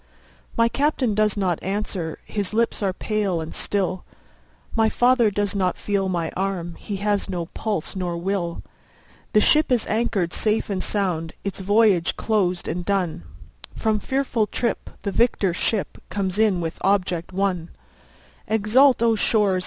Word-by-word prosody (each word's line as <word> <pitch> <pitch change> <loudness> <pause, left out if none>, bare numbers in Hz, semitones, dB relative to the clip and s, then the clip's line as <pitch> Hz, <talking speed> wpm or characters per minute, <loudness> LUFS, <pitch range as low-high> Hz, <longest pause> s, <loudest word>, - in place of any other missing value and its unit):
My 230 0 +5
Captain 275 -3 +1
does 210 0 +1
not 185 -4 0
answer, 190 -5 -3
his 205 0 -3
lips 230 0 +1
are 195 -2 +1
pale 200 -2 -1
and 160 0 -6
still, 185 -2 -1 0.7
My 225 -1 +4
father 245 -1 +4
does 205 -1 -1
not 185 -2 0
feel 195 -2 -1
my 170 -3 -1
arm, 185 -3 -2
he 205 - -5
has 205 +1 0
no 175 -3 -2
pulse 200 0 -3
nor 180 -2 -2
will; 175 -1 -2 0.7
The 210 - +6
ship 305 +3 +4
is 245 -3 +2
anchor'd 215 -6 0
safe 215 -1 0
and 185 -2 -1
sound, 175 -6 -1
its 200 -1 -4
voyage 200 -3 +3
closed 190 -5 0
and 175 +2 -2
done, 180 - -1 0.5
From 220 -1 +1
fearful 255 -3 0
trip 235 - -2
the 200 - -1
victor 195 -3 +2
ship 200 +3 -1
comes 195 -1 -2
in 205 -5 +3
with 165 0 -4
object 185 -3 +1
won; 185 -3 -1 0.8
20 220 - +1
Exult, 235 +4 +4
O 230 -1 +4
shores! 205 -3 +2
200 Hz, 155 wpm, -23 LUFS, 180-220 Hz, 0.8 s, The